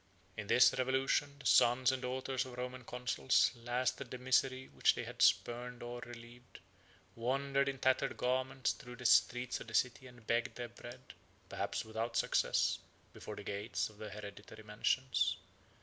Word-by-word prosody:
In 105 Hz, -1 st, -6 dB
this 125 Hz, -, +6 dB
revolution, 135 Hz, +2 st, +1 dB
the 140 Hz, -, -14 dB
sons 125 Hz, +2 st, +5 dB
and 130 Hz, -1 st, -3 dB
daughters 130 Hz, +1 st, -2 dB
of 125 Hz, -2 st, -10 dB
Roman 125 Hz, 0 st, -5 dB
consuls 125 Hz, +2 st, +1 dB
tasted 125 Hz, +2 st, -1 dB
the 125 Hz, -, -5 dB
misery 130 Hz, +1 st, +1 dB
which -, -, +2 dB
they -, -, -4 dB
had -, -, -7 dB
spurned 120 Hz, +1 st, +2 dB
or 120 Hz, 0 st, -6 dB
relieved, 120 Hz, 0 st, -12 dB, 0.6 s
wandered 140 Hz, +3 st, 0 dB
in 135 Hz, -, -4 dB
tattered 130 Hz, 0 st, +1 dB
garments 130 Hz, +1 st, 0 dB
through 125 Hz, 0 st, -9 dB
the 125 Hz, 0 st, -11 dB
streets 125 Hz, +1 st, +3 dB
of -, -, -10 dB
the 110 Hz, -, -6 dB
city 125 Hz, +3 st, +1 dB
and 120 Hz, -2 st, -16 dB
begged 115 Hz, +1 st, 0 dB
their 120 Hz, -1 st, -5 dB
bread, 120 Hz, +2 st, -12 dB, 0.4 s
perhaps -, -, -3 dB
without 110 Hz, +2 st, -3 dB
success, -, -, +2 dB, 0.3 s
before -, -, -8 dB
the -, -, -8 dB
gates 100 Hz, +3 st, -2 dB
of 105 Hz, -, -20 dB
their 105 Hz, -, -6 dB
hereditary 105 Hz, +1 st, -10 dB
mansions. 115 Hz, +5 st, 0 dB
125 Hz, 165 wpm, -35 LUFS, 120-130 Hz, 0.6 s, this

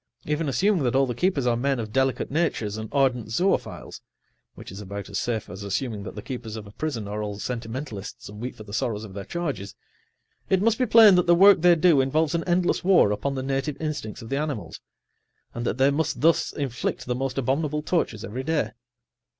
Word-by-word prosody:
Even 150 Hz, 0 st, -1 dB
assuming 190 Hz, +5 st, +2 dB
that 125 Hz, -1 st, 0 dB
all 135 Hz, 0 st, +4 dB
the 125 Hz, -, -3 dB
keepers 150 Hz, 0 st, 0 dB
are 120 Hz, -1 st, +3 dB
men 135 Hz, +3 st, 0 dB
of 110 Hz, -2 st, -5 dB
delicate 135 Hz, +1 st, 0 dB
natures 135 Hz, -10 st, 0 dB
and 110 Hz, 0 st, -6 dB
ardent 130 Hz, -5 st, +1 dB
zoophiles 180 Hz, -, -1 dB, 0.5 s
(which -, -, -10 dB
is 100 Hz, +2 st, -8 dB
about 100 Hz, 0 st, -7 dB
as 100 Hz, -, -1 dB
safe 115 Hz, -3 st, -2 dB
as 95 Hz, -, -9 dB
assuming 105 Hz, +2 st, -3 dB
that -, -, -8 dB
the 105 Hz, -, -7 dB
keepers 120 Hz, -3 st, -6 dB
of 110 Hz, -2 st, -7 dB
a 100 Hz, -, -12 dB
prison 120 Hz, -4 st, -4 dB
are 105 Hz, +1 st, -4 dB
all 105 Hz, -1 st, -4 dB
sentimentalists, 115 Hz, -1 st, -6 dB
and 105 Hz, +1 st, -10 dB
weep 125 Hz, -, -5 dB
for 110 Hz, -, -10 dB
the 100 Hz, -1 st, -11 dB
sorrows 110 Hz, -1 st, -1 dB
of 100 Hz, -3 st, -9 dB
their 100 Hz, 0 st, -6 dB
charges), 140 Hz, -, -4 dB, 0.7 s
it 190 Hz, -, +3 dB
must 225 Hz, +3 st, +2 dB
be 255 Hz, -, +2 dB
plain 220 Hz, -2 st, +8 dB
that 180 Hz, -1 st, +3 dB
the 175 Hz, -, +6 dB
work 195 Hz, 0 st, +7 dB
they 175 Hz, 0 st, +6 dB
do 160 Hz, -4 st, +4 dB
involves 150 Hz, +4 st, +1 dB
an 170 Hz, -1 st, 0 dB
endless 175 Hz, 0 st, +1 dB
war 180 Hz, -, +5 dB
upon 135 Hz, +6 st, -2 dB
the 130 Hz, -, -3 dB
native[Pg 135 Hz, +2 st, -1 dB
85] -, -, -15 dB
instincts 150 Hz, -9 st, -4 dB
of 115 Hz, -, -9 dB
the 135 Hz, -, -1 dB
animals, 140 Hz, -, -4 dB, 0.7 s
and 120 Hz, 0 st, -3 dB
that -, -, -1 dB
they 135 Hz, +1 st, +4 dB
must 155 Hz, +2 st, -1 dB
thus 165 Hz, +1 st, +3 dB
inflict 135 Hz, -5 st, -3 dB
the 125 Hz, -, -1 dB
most 130 Hz, +1 st, -3 dB
abominable 150 Hz, +3 st, 0 dB
tortures 135 Hz, -, -1 dB
every 125 Hz, +5 st, -5 dB
day. 150 Hz, -7 st, 0 dB
135 Hz, 220 wpm, -25 LUFS, 110-160 Hz, 0.7 s, plain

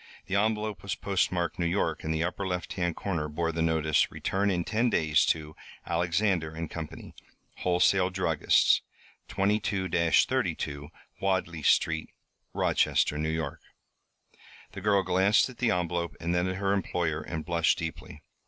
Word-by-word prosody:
The 95 Hz, -, -6 dB
envelope 105 Hz, 0 st, 0 dB
was 100 Hz, -, -3 dB
postmarked 90 Hz, -4 st, -1 dB
New 85 Hz, -, +1 dB
York 85 Hz, -3 st, -1 dB
and 80 Hz, -, -2 dB
the 80 Hz, +1 st, 0 dB
upper 90 Hz, +3 st, -3 dB
left 90 Hz, -1 st, -3 dB
hand 85 Hz, -3 st, -1 dB
corner 80 Hz, -6 st, -3 dB
bore 80 Hz, +2 st, -1 dB
the 85 Hz, 0 st, -3 dB
notice: 80 Hz, -2 st, +2 dB
Return 100 Hz, +1 st, -1 dB
in 90 Hz, -3 st, 0 dB
10 115 Hz, +7 st, +1 dB
days 80 Hz, -6 st, +2 dB
to 75 Hz, -1 st, -1 dB, 0.3 s
Alexander 85 Hz, -2 st, 0 dB
& -, -, -23 dB
Company, 80 Hz, -2 st, -7 dB, 0.4 s
Wholesale 90 Hz, +1 st, +3 dB
Druggists, 90 Hz, -5 st, +3 dB, 0.5 s
22 100 Hz, -1 st, 0 dB, 0.4 s
32 70 Hz, 0 st, -2 dB, 0.3 s
Wadley 95 Hz, -4 st, -1 dB
Street, 80 Hz, +2 st, +2 dB, 0.4 s
Rochester, -, -, +1 dB
N. 80 Hz, +1 st, -1 dB
Y. 80 Hz, -3 st, -2 dB, 1.2 s
The 100 Hz, -, -8 dB
girl 100 Hz, -1 st, +3 dB
glanced 95 Hz, +4 st, +3 dB
at 125 Hz, -, -13 dB
the 125 Hz, -, +2 dB
envelope 85 Hz, -1 st, -1 dB
and 85 Hz, +1 st, -2 dB
then 90 Hz, +1 st, +1 dB
at 95 Hz, -, -2 dB
her 100 Hz, 0 st, 0 dB
employer 85 Hz, -5 st, -1 dB
and 80 Hz, -1 st, -5 dB
blushed 85 Hz, 0 st, +2 dB
deeply. 80 Hz, -2 st, -7 dB
85 Hz, 150 wpm, -28 LUFS, 80-95 Hz, 1.2 s, Wholesale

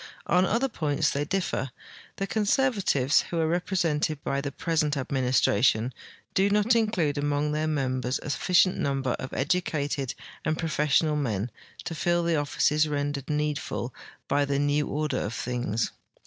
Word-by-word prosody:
On 180 Hz, +2 st, +3 dB
other 240 Hz, +5 st, +1 dB
points 150 Hz, -, 0 dB
they 145 Hz, +1 st, -1 dB
differ. 175 Hz, -6 st, -1 dB, 0.5 s
The 195 Hz, -, -2 dB
conservatives, 200 Hz, -, +2 dB
who 170 Hz, -, -1 dB
are 160 Hz, -, +2 dB
repre 175 Hz, +3 st, -1 dB
sented 155 Hz, -2 st, +1 dB
by 140 Hz, 0 st, -1 dB
the 140 Hz, 0 st, -4 dB
present 155 Hz, -1 st, 0 dB
administration, 125 Hz, -3 st, +2 dB, 0.4 s
do 195 Hz, +1 st, +3 dB
not 210 Hz, +3 st, +3 dB
include 180 Hz, -11 st, +1 dB
among 145 Hz, +1 st, 0 dB
their 155 Hz, +1 st, 0 dB
members 130 Hz, -4 st, -1 dB
a 150 Hz, -, -3 dB
sufficient 185 Hz, +4 st, +3 dB
number 135 Hz, -2 st, 0 dB
of 130 Hz, -, -6 dB
educated 145 Hz, -3 st, -1 dB, 0.3 s
and 155 Hz, +1 st, 0 dB
])rofessionalunen 150 Hz, -, +1 dB, 0.3 s
to 165 Hz, -, -4 dB
fill 175 Hz, +2 st, +1 dB
the 170 Hz, -1 st, +1 dB
offices 150 Hz, +1 st, +2 dB
rendered 145 Hz, -2 st, -2 dB
needful 150 Hz, -4 st, -2 dB, 0.3 s
by 145 Hz, 0 st, +2 dB
the 140 Hz, 0 st, 0 dB
new 145 Hz, +1 st, +1 dB
order 150 Hz, +1 st, -1 dB
of 105 Hz, +3 st, -3 dB
things. 120 Hz, -3 st, -2 dB
150 Hz, 150 wpm, -27 LUFS, 140-170 Hz, 0.5 s, On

